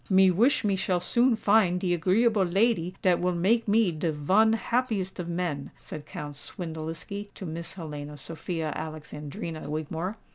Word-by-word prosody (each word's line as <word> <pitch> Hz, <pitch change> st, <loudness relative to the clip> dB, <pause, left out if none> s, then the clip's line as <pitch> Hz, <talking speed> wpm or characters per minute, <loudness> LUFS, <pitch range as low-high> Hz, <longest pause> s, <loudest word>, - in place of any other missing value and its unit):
"Me 190 Hz, -1 st, +6 dB
wish 235 Hz, -, +3 dB
me 200 Hz, -2 st, +2 dB
shall 185 Hz, -1 st, 0 dB
soon 240 Hz, +6 st, +3 dB
find 200 Hz, -4 st, +3 dB
de 180 Hz, -2 st, +1 dB
agreeable 200 Hz, +5 st, +3 dB
lady 185 Hz, -1 st, +1 dB
dat 180 Hz, -2 st, +4 dB
will 180 Hz, 0 st, +1 dB
make 220 Hz, +7 st, +2 dB
me 210 Hz, -2 st, +4 dB
de 160 Hz, +1 st, -1 dB
von 190 Hz, +10 st, +3 dB
happiest 225 Hz, -5 st, -1 dB
of 175 Hz, -, -3 dB
men," 170 Hz, -5 st, -2 dB
said 155 Hz, -1 st, -9 dB
Count 150 Hz, -1 st, -6 dB
Swindeliski 165 Hz, +5 st, -6 dB
to 190 Hz, -, -7 dB
Miss 165 Hz, +2 st, -6 dB
Helena 150 Hz, -4 st, -7 dB
Sophia 160 Hz, +2 st, -4 dB
Alexandrina 155 Hz, +1 st, -6 dB
Wigmore. 160 Hz, +6 st, -3 dB
180 Hz, 155 wpm, -27 LUFS, 160-205 Hz, -, Me